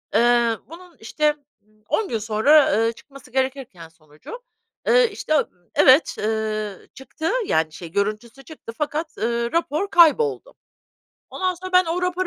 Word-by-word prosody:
eee, 235 0 +3
bunun, 345 -1 -14
işte, 300 +7 0 0.5
10 435 - 0
gün 230 - -1
sonra, 225 +1 +3
eee, - - 0
çıkması 275 0 -16
gerekirken 260 -10 -3
sonucu, 160 - -13 0.4
eee, - - +4
işte, 310 - -4
ııı, 300 - +2 0.3
evet, 265 +4 +5
ııı, 215 -2 -3
çıktı 270 +5 -5
yani 160 - 0
şey 170 -2 -10
görüntüsü 215 +6 -3
çıktı 290 -7 -11
fakat, 305 +2 -4
ııı, 235 +1 -2
rapor 335 +3 -1
kayboldu. 420 +9 +3 0.8
Ondan 370 -1 -2
sonra 370 +2 -9
ben 365 0 +5
o 340 +2 -3
rapor 365 +1 -1
270 Hz, 140 wpm, -22 LUFS, 220-335 Hz, 0.8 s, evet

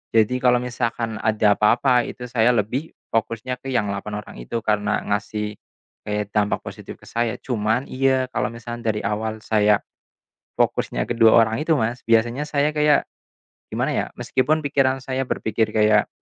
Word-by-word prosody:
Jadi 115 +3 +3
kalau 125 -1 +4
misalkan 115 -2 -3
ada 110 -1 +3
apa-apa, 125 +3 +3
itu 125 - -8
saya 120 0 +3
lebih 120 +8 -2 0.2
fokusnya 115 +3 -2
ke 135 +1 -6
yang 110 -5 0
8 100 +1 -5
orang - - -13
itu - - -4
karena 105 -1 0
ngasih, 105 +1 -2 0.5
kayak 105 -1 -2
dampak 105 -1 0
positif - - -9
ke - - -25
saya. 115 -2 -1
Cuman 115 0 0
iya 130 0 +2
kalau - - 0
misalkan 120 +1 -7
dari 105 -1 0
awal 110 0 -3
saya 105 -1 +3 0.8
fokusnya - - 0
ke 120 - -2
2 115 -1 +6
orang 115 +5 +2
itu 160 - +2
Mas, 115 +3 -2
biasanya 115 +4 +2
saya 150 0 +1
kayak 150 -1 +3 0.6
gimana - - -1
ya - - 0
meskipun 145 +5 +1
pikiran 135 -2 +1
saya 130 0 -2
berpikir 110 -1 -1
kayak, 105 -1 +4
115 Hz, 165 wpm, -22 LUFS, 105-125 Hz, 0.8 s, 2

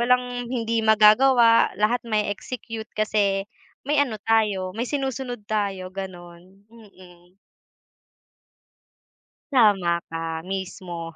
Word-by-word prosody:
Walang 245 0 0
hindi 230 -2 -1
magagawa, 230 +2 +5
lahat 215 +5 +1
mae-execute 220 +2 -4
kasi 205 -2 +1 0.4
may 290 +1 +2
ano 255 -6 0
tayo, 210 -5 +1
may 235 +5 -4
sinusunod 265 -5 -4
tayo, 200 -3 -3
gano'n, 185 0 -10
mm. 185 -5 -18 2.2
Tama 200 -9 +3
ka. 165 0 -5
Mismo. 185 -3 -6
210 Hz, 90 wpm, -23 LUFS, 185-235 Hz, 2.2 s, magagawa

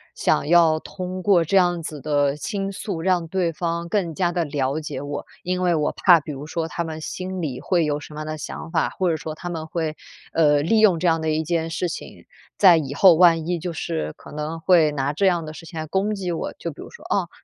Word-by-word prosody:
想 - - +1
要 165 -1 +5
通 185 +2 -6
过 180 -3 +4
这 180 - -1
样 175 -3 +3
子 155 -2 -7
的 145 -1 +1
倾 195 +6 -3
诉 195 -2 -5
让 180 -1 +1
对 175 0 0
方 170 +1 -3
更 175 -5 -1
加 175 0 +1
地 175 -1 0
了 145 -1 -1
解 155 - -5
我。 145 0 -5 0.2
因 180 0 -1
为 175 -2 +2
我 150 -1 +1
怕 175 -4 +5
比 150 0 -7
如 140 +2 -7
说 165 0 -2
他 170 - -3
们 160 -1 -6
心 185 +4 -5
里 135 -6 -4
会 175 -4 +1
有 145 -1 -1
什 150 +1 -11
么 155 - -5
样 - - -5
的 155 0 -5
想 160 - -7
法， 165 -2 +1
或 185 -2 -1
者 160 - -1
说 155 0 -6
他 175 - -6
们 160 -2 -5
会， 160 -1 -3 0.4
呃， 150 -3 +4
利 220 +8 +3
用 200 -6 +5
这 180 - +1
样 165 -1 +2
的 160 - -1
一 155 +1 0
件 165 0 -1
事 175 +2 -2
情， - - -8 0.3
在 180 -4 +7
以 140 -3 -3
后 185 +3 +7
万 165 -1 +5
一 175 -1 -1
就 175 +2 -4
是 80 - -3
可 - - -13
能 150 +2 -4
会 165 -4 +4
拿 140 0 -1
这 195 +6 +2
样 175 -3 +1
的 155 - -7
事 165 +1 -11
情 160 0 -7
来 155 - -3
攻 195 +6 0
击 185 -3 -3
我， 165 - -3
就 - - -5
比 - - -12
如 - - -9
说 475 - -14
“哦， - - 0
165 Hz, 270 characters per minute, -23 LUFS, 155-180 Hz, 0.4 s, 在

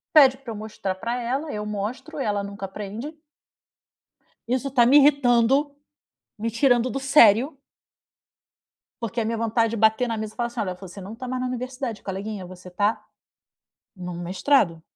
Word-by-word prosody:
Pede 270 -4 +8
pra 250 -4 -8
eu - - -7
mostrar 210 -3 -4
pra 235 +6 -3
ela, 270 +6 -2
eu 210 0 -4
mostro, 245 +10 -5
ela 205 -6 -1
nunca 200 0 -6
aprende. 210 +10 -7 1.3
Isso 260 +2 -1
tá 245 -3 +4
me 280 +4 +7
irritando. 275 0 +4 0.6
Me 225 +2 -2
tirando 245 0 +3
do 270 - -3
sério. 270 0 +5 1.5
Porque 230 +1 -2
a - - 0
minha 230 +1 -1
vontade 230 0 +1
de 230 - -3
bater 220 +3 +3
na 230 - -2
mesa 215 -1 -5
e - - -31
falar 240 -1 0
assim: 235 0 -5
"Olha, 185 -3 -2
você 190 +1 -11
não 195 +4 -8
tá 255 +2 -7
mais 255 0 -2
na 255 - -1
universidade 255 -2 -5
coleguinha 195 0 -5
você 180 0 -12
tá, 205 +4 0 0.9
num 180 -1 -6
mestrado." 180 - +1
230 Hz, 170 wpm, -24 LUFS, 205-260 Hz, 1.5 s, Pede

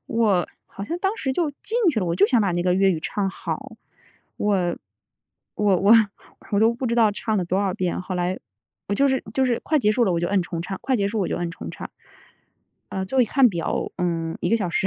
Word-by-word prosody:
我 215 -6 +1 0.2
好 200 - -10
像 335 +12 -3
当 390 +3 0
时 265 - -2
就 315 +2 0
进 435 - -3
去 225 - -1
了。 180 - -1
我 170 +1 -1
就 200 - +5
想 240 -1 +3
把 195 -4 +1
那 175 0 0
个 180 0 +2
粤 190 +1 +4
语 165 - -1
唱 195 +4 -2
好， 190 - -6 0.6
我， 190 -4 0 0.8
我 205 -3 +3
我 200 +5 +4 0.6
我 200 - +3
都 225 +2 +4
不 250 +2 -4
知 235 - 0
道 225 -3 +4
唱 215 +1 -2
了 180 - 0
多 185 +3 0
少 190 -2 -1
遍， 180 -1 -2
后 185 0 -5
来 180 +1 -1 0.5
我 205 - 0
就 280 +6 +3
是 265 -1 +1
就 265 - +2
是 240 -2 0
快 310 -1 +1
结 210 -4 +2
束 240 +1 +2
了， 185 - +2
我 - - +1
就 175 - 0
摁 200 -1 +2
重 170 -1 -4
唱， 190 +1 -5
快 260 -2 0
结 200 -2 0
束 210 +1 -2
我 185 - 0
就 - - -2
摁 175 -1 -3
重 170 - -8
唱， - - -8 1.0
呃， 190 0 -3
最 265 +7 -2
后 - - +7
一 240 - +4
看 265 +3 +4
表， 170 -3 -2
嗯， 165 -2 -2
1 - - -1
个 230 - +3
小 185 -6 -2
时。 195 - +1
200 Hz, 265 characters per minute, -23 LUFS, 180-235 Hz, 1.0 s, 后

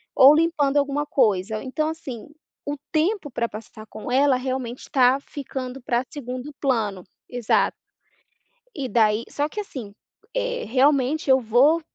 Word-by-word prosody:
ou 270 +3 +9
limpando 305 -3 +2
alguma 285 +1 +1
coisa". 215 -6 +1
Então, 305 +4 -1
assim, 285 -8 -7 0.4
o 290 - -2 0.2
tempo 325 +1 0
pra 235 -2 -1
passar 215 0 -10
com 215 +2 -8
ela 270 0 +4
realmente 255 -1 -4
tá 260 -1 +4
ficando 265 -2 -6
pra 240 0 0
segundo 255 0 -6
plano. 215 -9 0 0.3
Exato. 245 -3 +1 1.0
E 275 -3 -3
daí 220 0 +2
só 290 +1 -1
que, 420 - -6
assim, 255 - -7 0.4
eh, - - -2
realmente 275 +4 +2
eu 265 0 +6
vou 255 +9 +4
265 Hz, 140 wpm, -23 LUFS, 240-295 Hz, 1.0 s, ou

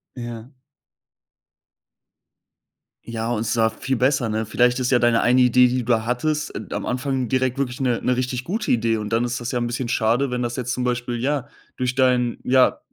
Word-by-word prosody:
Ja. 120 -1 -7 2.5
Ja, 115 0 -4
und 110 -2 -1
zwar 110 0 +2
viel 125 +3 -3
besser, 130 -1 +1
ne? 110 +1 -1
Vielleicht 125 +3 +2
ist 125 0 0
ja 125 - +5
deine 120 -1 +3
eine 125 +1 +4
Idee, 125 0 +5
die 125 0 -1
du 115 -1 +1
hattest, 150 +5 -1
äh, - - -4
am - - -3
Anfang 130 0 -2
direkt 130 +1 0
wirklich 130 -3 -2
'ne 125 -3 +1
'ne 125 - +1
richtig 125 0 -2
gute 210 - -2
Idee. 115 -1 +2
Und 105 -1 -4
dann 115 +1 +2
ist 120 0 -3
das 120 0 -4
ja 125 - -1
'n 120 - -1
bisschen 120 0 -3
schade, 120 +4 +1
wenn 125 0 -2
das 120 0 -2
jetzt 125 -1 -3
zum 125 - -2
Beispiel, 120 -1 -2
ja, 140 0 -1 0.3
durch 125 0 -1
deinen, 125 -2 +2
ja, 130 0 +3
125 Hz, 200 wpm, -22 LUFS, 120-130 Hz, 2.5 s, ja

